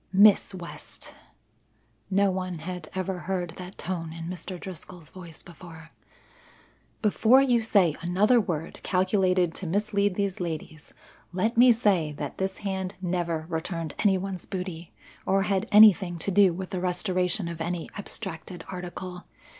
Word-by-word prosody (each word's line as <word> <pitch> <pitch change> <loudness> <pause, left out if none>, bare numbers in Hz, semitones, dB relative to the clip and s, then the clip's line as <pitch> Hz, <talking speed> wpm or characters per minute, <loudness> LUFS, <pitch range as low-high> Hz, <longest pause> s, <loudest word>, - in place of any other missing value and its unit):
"Miss 200 0 +5
West," 175 -2 -8 1.0
no 200 0 +3
one 185 -1 -3
had 175 0 -6
ever 185 -1 -2
heard 180 -2 -3
that 185 +1 -9
tone 165 -3 -4
in 165 0 -7
Mr. 180 +1 -6
Driscoll's 175 -2 -9
voice 170 -4 -11
before, 165 -2 -13 1.1
"before 220 +4 +5
you 245 -3 +3
say 200 -8 +3
another 205 +8 +3
word 165 -5 -4
calculated 185 -2 +2
to 190 - -6
mislead 200 +1 +1
these 200 -2 -1
ladies, 160 -3 -6 0.4
let 205 +6 0
me 245 +1 +7
say 195 -10 +2
that 145 -1 -6
this 190 0 -2
hand 190 0 -2
never 170 -3 -2
returned 165 -1 -4
any 195 -3 +3
one's 185 -1 -5
booty 180 -3 -5 0.4
or 195 0 +3
had 195 -1 -1
anything 200 -4 +7
to 180 +4 -2
do 195 -1 +5
with 185 +3 -6
the 185 -2 -2
restoration 180 0 0
of 170 -1 -6
any 170 0 -3
abstracted 185 -4 -6
article. 180 0 -7
185 Hz, 145 wpm, -27 LUFS, 170-195 Hz, 1.1 s, me